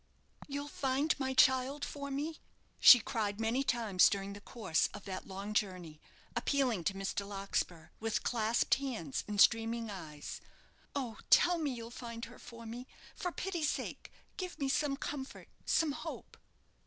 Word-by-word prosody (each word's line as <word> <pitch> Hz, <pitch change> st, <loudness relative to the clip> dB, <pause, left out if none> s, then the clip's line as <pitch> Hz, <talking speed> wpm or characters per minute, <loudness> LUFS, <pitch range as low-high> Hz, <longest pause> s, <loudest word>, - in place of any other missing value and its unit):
"You'll 285 Hz, 0 st, -4 dB
find 280 Hz, +2 st, +1 dB
my 265 Hz, -1 st, -1 dB
child 260 Hz, +3 st, +4 dB
for 280 Hz, -1 st, -6 dB
me?" 295 Hz, +4 st, -3 dB, 0.4 s
she 245 Hz, -, +11 dB
cried 220 Hz, -5 st, -2 dB
many 230 Hz, +4 st, +1 dB
times 225 Hz, -8 st, +4 dB
during 200 Hz, 0 st, -3 dB
the 205 Hz, -, -10 dB
course 200 Hz, -8 st, 0 dB
of 205 Hz, -, -10 dB
that 185 Hz, -1 st, -5 dB
long 200 Hz, +2 st, -5 dB
journey, 180 Hz, -7 st, -2 dB, 0.3 s
appealing 255 Hz, -10 st, +1 dB
to 195 Hz, -, +1 dB
Mr. 195 Hz, +1 st, -2 dB
Larkspur, 195 Hz, -4 st, -3 dB
with 225 Hz, 0 st, -1 dB
clasped 230 Hz, -1 st, +2 dB
hands 240 Hz, -, -2 dB
and 210 Hz, -1 st, -3 dB
streaming 225 Hz, +1 st, +4 dB
eyes. 155 Hz, -6 st, -7 dB, 0.5 s
"Oh, 245 Hz, -6 st, -3 dB
tell 355 Hz, -1 st, +6 dB
me 305 Hz, -3 st, 0 dB
that 250 Hz, -, -4 dB
you'll 230 Hz, 0 st, -7 dB
find 235 Hz, -1 st, -6 dB
her -, -, -13 dB
for 230 Hz, -1 st, -11 dB
me. 240 Hz, +3 st, -7 dB, 0.3 s
For 355 Hz, -, -3 dB
pity's 345 Hz, -5 st, -1 dB
sake, -, -, -4 dB, 0.3 s
give 365 Hz, -2 st, -5 dB
me 275 Hz, -2 st, -1 dB
some 275 Hz, 0 st, +1 dB
comfort 275 Hz, -1 st, -6 dB, 0.2 s
some 320 Hz, -2 st, +3 dB
hope." -, -, -7 dB
235 Hz, 160 wpm, -34 LUFS, 200-275 Hz, 0.5 s, she